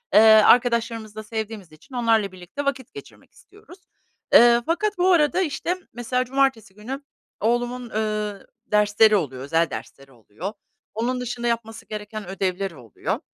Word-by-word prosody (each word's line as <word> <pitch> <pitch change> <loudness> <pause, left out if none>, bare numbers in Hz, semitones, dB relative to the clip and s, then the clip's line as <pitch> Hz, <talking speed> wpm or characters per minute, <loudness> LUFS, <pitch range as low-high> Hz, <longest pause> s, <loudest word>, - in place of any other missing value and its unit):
ııı, 215 - +9 0.2
arkadaşlarımızı 230 -3 +2
da 215 - -6
sevdiğimiz 215 -5 -6
için 250 - -15
onlarla 225 -5 +2
birlikte 185 +11 -7
vakit 265 - -3
geçirmek 420 - -13
istiyoruz. 390 -2 -17 0.6
Iıı, 235 0 +7
fakat 415 +5 -1
bu 365 +1 +3
arada, 340 +1 +3
işte, 345 +1 -1 0.2
mesela 250 +1 -1
cumartesi 265 -6 0
günü 255 +7 -7 0.4
oğlumun, 240 +2 -1
ııı, 215 -2 -3 0.2
dersleri 210 +1 +4
oluyor, 135 -8 -2
özel 165 +3 +1
dersleri 135 0 -9
oluyor. 125 - -8 0.4
Onun 250 +3 -2
dışında 240 0 -3
yapması 225 -1 -3
gereken 210 -1 -7
ödevleri 190 -1 -2
oluyor. 115 -4 -4
225 Hz, 140 wpm, -23 LUFS, 205-250 Hz, 0.6 s, ııı